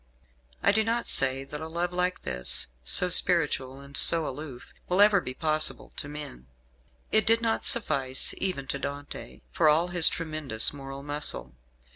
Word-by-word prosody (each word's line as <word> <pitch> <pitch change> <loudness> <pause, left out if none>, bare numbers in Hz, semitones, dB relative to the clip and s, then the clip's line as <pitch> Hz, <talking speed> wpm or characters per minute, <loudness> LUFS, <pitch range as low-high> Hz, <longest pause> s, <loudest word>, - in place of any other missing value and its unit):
I - - +4
do 220 +2 +1
not 230 +2 -2
say 135 0 +1
that 150 +2 -9
a 160 - -6
love 170 +2 -4
like 180 0 -2
this 60 -1 0
so 180 - +4
spiritual 150 -7 +1
and 140 0 -13
so 165 +1 +4
aloof 135 -2 -9 0.2
will 180 +2 0
ever 205 -2 +5
be 125 -4 -7
possible 155 +1 -1
to - - -5
men. 145 - -10 0.6
It 215 +1 +3
did 225 +1 +4
not 230 -1 -2
suffice 135 - +1
even 185 -8 -3
to 140 - -3
Dante, 145 +1 -8
for 160 -2 +2
all 165 +4 +2
his 175 -2 +5
tremendous 155 -9 0
moral 135 -1 -9
muscle. 145 - +1
155 Hz, 165 wpm, -26 LUFS, 135-180 Hz, 0.6 s, ever